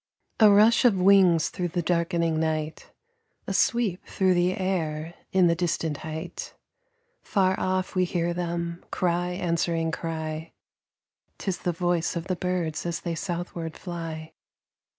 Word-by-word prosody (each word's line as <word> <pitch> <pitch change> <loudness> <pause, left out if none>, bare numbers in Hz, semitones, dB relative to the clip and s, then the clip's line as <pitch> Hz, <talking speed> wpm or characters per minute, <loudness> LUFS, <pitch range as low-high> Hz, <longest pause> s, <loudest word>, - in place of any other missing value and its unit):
A 215 -2 +8
rush 210 +3 +6
of 235 -6 +5
wings 180 -4 +5
through 180 - -3
the 175 0 -2
darkening 170 -1 +1
night, 155 -1 -2 0.6
A - - -3
sweep 230 -7 +1
through 190 -1 +2
the 180 +1 +1
air 165 -4 -2 0.2
in 190 -2 +4
the 170 - +4
distant 165 -3 -1
height. 160 +3 -6 0.7
Far 190 -2 +2
off 185 0 -1
we 185 -1 +2
hear 175 -1 -1
them, 170 0 -3
cry 175 0 0
answering 170 -2 0
cry: 160 -1 -4 0.8
'Tis 190 -3 -3
the 175 - -1
voice 175 0 0
of 170 0 -3
the 185 -1 -1
birds 180 -3 -2
as 170 - -3
they 170 - -3
southward 170 -1 -4
fly. 165 -3 -6
175 Hz, 140 wpm, -26 LUFS, 165-185 Hz, 0.8 s, A